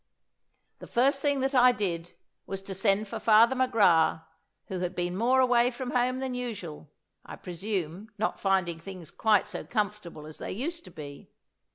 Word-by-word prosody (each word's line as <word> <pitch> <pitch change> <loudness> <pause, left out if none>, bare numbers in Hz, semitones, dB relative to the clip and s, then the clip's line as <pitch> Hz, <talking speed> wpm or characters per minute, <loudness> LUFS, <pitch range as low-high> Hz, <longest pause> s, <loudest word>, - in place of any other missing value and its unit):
"The - - -10
first 275 +3 +2
thing 285 -2 +1
that 270 +1 0
I 250 -1 +6
did 175 -6 -3 0.3
was 195 0 -5
to 195 - -6
send 195 +2 +1
for 225 +2 -5
Father 225 +4 +5
McGrath, 180 -11 +3 0.4
who 185 - -5
had 180 0 -3
been 175 0 -2
more 245 +6 +3
away 245 -1 +4
from 250 0 -5
home 250 +1 +1
than 260 -1 -3
usual 200 - -6 0.3
I - - -9
presume, 185 +1 -4
not 215 - -1
finding 185 -4 +1
things 180 -2 -9
quite 215 -3 +3
so 205 -4 -6
comfortable 205 -8 -3
as 155 0 -11
they - - -5
used 330 - -4
to - - -11
be. 145 -3 -10
210 Hz, 175 wpm, -28 LUFS, 175-245 Hz, 0.4 s, I